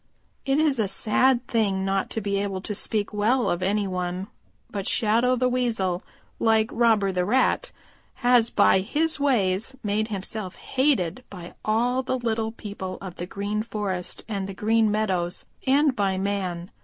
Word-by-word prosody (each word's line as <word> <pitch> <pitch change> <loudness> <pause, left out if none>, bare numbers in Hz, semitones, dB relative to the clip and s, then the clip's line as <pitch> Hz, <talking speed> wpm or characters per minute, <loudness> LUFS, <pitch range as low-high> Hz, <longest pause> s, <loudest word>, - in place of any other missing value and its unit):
"It 270 +1 +3
is 300 -5 +2
a 215 - +2
sad 245 +5 +2
thing 200 -5 0
not 195 0 0
to 225 - -3
be 200 -1 -1
able 195 -2 -2
to 210 - -4
speak 210 +1 -1
well 230 +5 +2
of 175 - 0
any 200 +2 +1
one, 180 +1 -3 0.4
but 200 -2 -3
Shadow 235 +2 +2
the 255 0 +1
Weasel, 225 -8 0 0.4
like 220 -1 +3
Robber 220 -4 +3
the 180 -1 0
Rat, 260 - +1 0.5
has 245 -2 +5
by 200 -3 +4
his 300 +11 -1
ways 225 -4 +1
made 210 +1 0
himself 195 -2 -5
hated 260 - 0
by 175 -3 -9
all 240 +4 +1
the 260 0 -1
little 225 -2 -1
people 200 -4 -6
of 185 -3 -8
the 175 - -5
Green 205 +2 -2
Forest 205 -5 -3
and 200 -3 -3
the 195 - -6
Green 220 +2 +2
Meadows 190 -5 -1 0.2
and 280 0 +4
by 195 -3 0
man. 190 -3 -2
210 Hz, 165 wpm, -25 LUFS, 190-240 Hz, 0.5 s, has